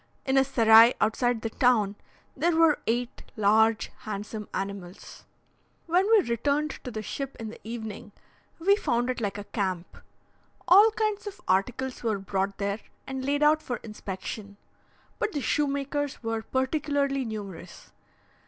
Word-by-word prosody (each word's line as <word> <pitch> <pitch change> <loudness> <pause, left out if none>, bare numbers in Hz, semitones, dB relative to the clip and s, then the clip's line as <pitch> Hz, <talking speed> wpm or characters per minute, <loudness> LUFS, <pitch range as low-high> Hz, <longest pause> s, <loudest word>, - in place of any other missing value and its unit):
In 265 - +1
a 270 - +6
serai 230 -3 +6
outside 230 +2 +1
the 225 - -3
town 220 -6 +2 0.4
there 335 +4 +1
were 325 -2 +4
eight 240 +2 -1 0.2
large 220 +1 +3
handsome 210 0 -6
animals. 195 -2 -6 0.6
When 360 +5 +2
we 440 - +5
returned 285 +6 0
to 255 - -5
the 220 -3 -5
ship 275 +4 -5
in 225 -1 -5
the 225 - -11
evening, 220 -1 -7 0.5
we 395 +4 +4
found 245 - 0
it 255 - -5
like 200 -2 -2
a 205 - -5
camp. 185 -4 -3 0.7
All 405 +5 +8
kinds 430 -1 -1
of 395 - -7
articles 250 +7 0
were 220 -3 0
brought 195 0 -2
there 200 +1 -2 0.3
and 265 0 -5
laid 285 +2 +1
out 310 +1 +4
for 245 -5 -4
inspection; 200 -1 -7 0.6
but 420 - -1
the 290 - -1
shoemakers 280 -1 -1
were 225 0 -2
particularly 275 +2 0
numerous. 210 -6 -8
240 Hz, 145 wpm, -27 LUFS, 210-285 Hz, 0.7 s, All